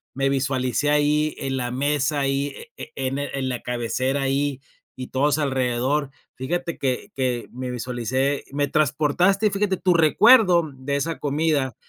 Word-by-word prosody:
Me 135 +1 +1
visualicé 135 0 0
ahí 150 +1 +2
en 135 0 -3
la 125 -2 -2
mesa 145 +2 0
ahí, 140 +1 -1 0.2
e - - -8
e 135 -1 -2
en 135 +2 -2
en 140 -2 -3
la 125 -2 -3
cabecera 130 +3 -1
ahí, 135 0 0 0.4
y 130 -1 -7
todos 145 +2 +2
alrededor, 135 0 0 0.3
fíjate 170 +6 -3
que 130 -3 -2
que 125 -3 -1
me 125 +1 -5
visualicé 125 +3 -2
me 145 0 0
transportaste, 155 - +2
fíjate 200 -1 0
tu 180 0 +2
recuerdo 175 - +5
de 135 +2 -3
esa 165 +3 -3
comida, 145 -3 0
140 Hz, 150 wpm, -23 LUFS, 130-150 Hz, 0.4 s, recuerdo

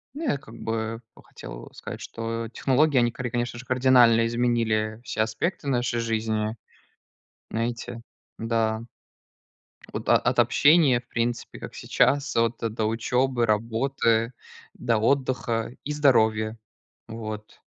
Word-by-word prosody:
Ну, 320 - -5
я 195 - +1
как 115 -4 -14
бы, 115 0 -3
ну, - - -16
хотел - - -10
сказать, - - -8
что 115 0 -4
технологии 140 +4 +2
они 120 -1 +4
кари 120 +1 -4
конечно 120 0 -2
же, 125 - -10
кардинально 125 -3 +5
изменили 115 -2 0
все 115 - -2
аспекты 115 - -2
нашей 120 -2 0
жизни. 110 -1 -1 1.0
Знаете. 115 +1 -3 0.4
Да. 115 -1 0 1.1
От - - -5
от - - +3
общения, 145 -5 +5
в 120 - -35
принципе 115 0 -2
как - - -8
сейчас, 140 0 +1
вот 115 0 +2
до 110 -1 -2
учёбы, 120 +3 +1
работы, 115 +1 +1 0.4
до 120 -2 +1
отдыха 120 -1 0
и 150 - -4
здоровья. 110 -6 +3 0.5
Вот. 110 -1 -7
115 Hz, 125 wpm, -25 LUFS, 110-125 Hz, 1.1 s, кардинально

